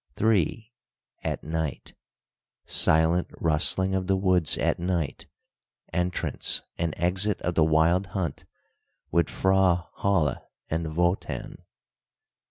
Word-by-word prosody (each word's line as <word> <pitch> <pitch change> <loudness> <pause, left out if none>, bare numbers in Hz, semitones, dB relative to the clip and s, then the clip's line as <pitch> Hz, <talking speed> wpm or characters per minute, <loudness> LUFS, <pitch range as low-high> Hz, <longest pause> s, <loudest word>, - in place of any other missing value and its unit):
III. 110 +2 +1 0.5
AT - - -3
NIGHT 80 -2 -4 0.7
SILENT 80 +3 +3
RUSTLING 85 +4 +2
OF 95 -1 -1
THE 95 -1 +2
WOODS 95 -4 +2
AT - - 0
NIGHT. 85 -4 -2 0.7
ENTRANCE 90 +1 -1
AND 85 -2 -2
EXIT 95 +4 +1
OF 90 - 0
THE 80 - +3
WILD 80 +5 +3
HUNT 95 -3 -4 0.7
WITH 85 0 +2
FRAU 95 -2 +2
HOLLE 90 -9 +1 0.3
AND 80 -1 -2
WOTAN. 90 +2 -1
90 Hz, 105 wpm, -26 LUFS, 80-95 Hz, 0.7 s, SILENT